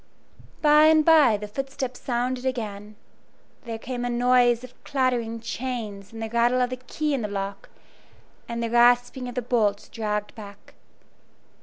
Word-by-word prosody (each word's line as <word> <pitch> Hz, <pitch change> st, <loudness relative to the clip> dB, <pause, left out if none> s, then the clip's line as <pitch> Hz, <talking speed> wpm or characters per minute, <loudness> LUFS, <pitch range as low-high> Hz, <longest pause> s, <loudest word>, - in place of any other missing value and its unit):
By 300 Hz, 0 st, +6 dB
and 310 Hz, -1 st, +5 dB
by 300 Hz, -9 st, +6 dB
the 210 Hz, +1 st, -7 dB
footsteps 265 Hz, +2 st, -5 dB
sounded 250 Hz, +1 st, -2 dB
again; 215 Hz, -5 st, -4 dB, 0.7 s
there 230 Hz, -1 st, -4 dB
came 245 Hz, +2 st, -5 dB
a 245 Hz, -, -1 dB
noise 245 Hz, 0 st, +3 dB
of 255 Hz, 0 st, -14 dB
clattering 245 Hz, -4 st, -1 dB
chains 225 Hz, -4 st, -5 dB
and 225 Hz, 0 st, -7 dB
the 220 Hz, -, -4 dB
rattle 235 Hz, +2 st, +2 dB
of 250 Hz, 0 st, 0 dB
the 255 Hz, -, -3 dB
key 295 Hz, +4 st, -3 dB
in 270 Hz, -, -1 dB
the 210 Hz, -, -2 dB
lock, 200 Hz, -1 st, -5 dB, 0.8 s
and 235 Hz, 0 st, -3 dB
the 230 Hz, -, -3 dB
rasping 245 Hz, +2 st, +3 dB
of 245 Hz, -, -9 dB
the 250 Hz, -, -2 dB
bolts 215 Hz, -4 st, 0 dB
dragged 210 Hz, -2 st, -3 dB
back. 200 Hz, -2 st, -12 dB
240 Hz, 160 wpm, -25 LUFS, 220-255 Hz, 0.8 s, By